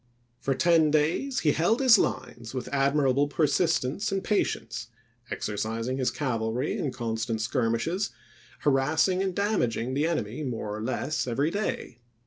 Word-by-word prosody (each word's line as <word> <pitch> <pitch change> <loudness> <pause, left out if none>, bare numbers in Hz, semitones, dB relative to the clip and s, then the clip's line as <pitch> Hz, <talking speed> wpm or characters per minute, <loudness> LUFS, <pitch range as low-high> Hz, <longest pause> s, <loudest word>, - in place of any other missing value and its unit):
For 135 - 0
ten 160 +2 +4
days 160 - +1
he 150 - +3
held 175 +11 +2
his 255 -5 +7
lines 120 +1 -3
with 125 -1 -3
admirable 140 0 +3
persistence 155 +3 +1
and 195 -1 -1
patience, 115 - -1 0.4
exercising 115 +5 -2
his 130 - +2
cavalry 120 0 -1
in 140 - -2
constant 115 -1 -2
skirmishes, 120 - 0 0.5
harassing 155 +6 +2
and 190 -2 -1
damaging 130 - 0
the 145 +4 +1
enemy 130 -5 -2
more 110 -5 -3
or 110 - -5
less 130 +5 -2
every 140 +6 0
day. 200 - -3
135 Hz, 135 wpm, -27 LUFS, 115-165 Hz, 0.5 s, his